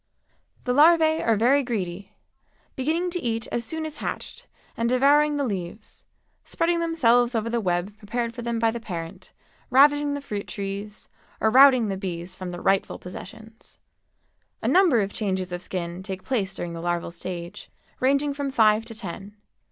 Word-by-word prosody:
The 250 - 0
larvæ 315 +2 +5
are 225 - +3
very 250 +7 +4
greedy, 195 -7 -4 0.6
beginning 325 +7 -1
to 355 0 -3
eat 230 -1 -2
as 235 - -1
soon 320 +7 -4
as 310 -1 -7
hatched - - -6 0.3
and 230 0 0
devouring 290 +4 +4
the 285 - 0
leaves, 195 -2 -6 0.4
spreading 335 0 0
themselves 245 -8 +3
over 225 +1 -1
the 235 -1 0
web 180 +1 -1
prepared 230 +3 -3
for 240 - -7
them 235 0 -2
by 225 0 +2
the 235 - -5
parent, 170 -7 -7 0.4
ravaging 290 +2 +4
the - - -3
fruit 210 -8 -5
trees, 200 +1 -6 0.3
or 220 - +2
routing 255 -3 +7
the 195 - -2
bees 180 -1 -5
from 185 -1 -6
their 175 0 -7
rightful 195 0 +1
possessions. 220 +5 -11 0.9
A - - 0
number 350 - +5
of 200 0 -3
changes 190 -3 -2
of 175 0 -4
skin 175 -1 -5
take 190 -1 -6
place 200 -7 -1
during 170 -1 -5
the 165 - -6
larval 175 0 -2
stage, 175 0 -7 0.3
ranging 280 +2 +2
from 280 -1 -3
five 220 -4 +4
to 225 -1 -10
ten. 200 -1 -8
225 Hz, 170 wpm, -25 LUFS, 190-275 Hz, 0.9 s, routing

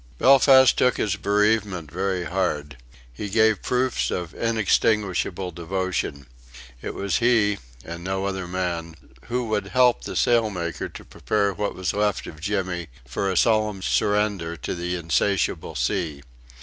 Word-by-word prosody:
Belfast 130 0 +6
took 125 -1 +2
his 105 -2 0
bereavement 105 -5 +1
very 95 0 -1
hard. 75 -7 -2 0.4
He 100 +11 -5
gave 110 -1 +3
proofs 125 0 0
of 90 -2 -4
unextinguishable 105 -4 0
devotion. 90 -5 -3 0.6
It - - -5
was 100 -2 0
he, 115 -4 +2 0.3
and 85 +1 -7
no 95 +1 -2
other 95 -2 -3
man, 85 -3 -3 0.3
who 125 0 -2
would 105 -2 -1
help 125 +2 +3
the - - -6
sailmaker 105 -8 0
to - - -11
prepare 100 -2 -1
what 105 0 -3
was 95 -3 -2
left 105 -2 0
of 80 -2 -10
Jimmy 95 -3 -2 0.2
for 70 +9 -2
a 95 - -1
solemn 110 -3 +2
surrender 100 -6 0
to - - -4
the 90 +1 -3
insatiable 90 +2 0
sea. 75 -4 -2
95 Hz, 140 wpm, -24 LUFS, 85-105 Hz, 0.6 s, Belfast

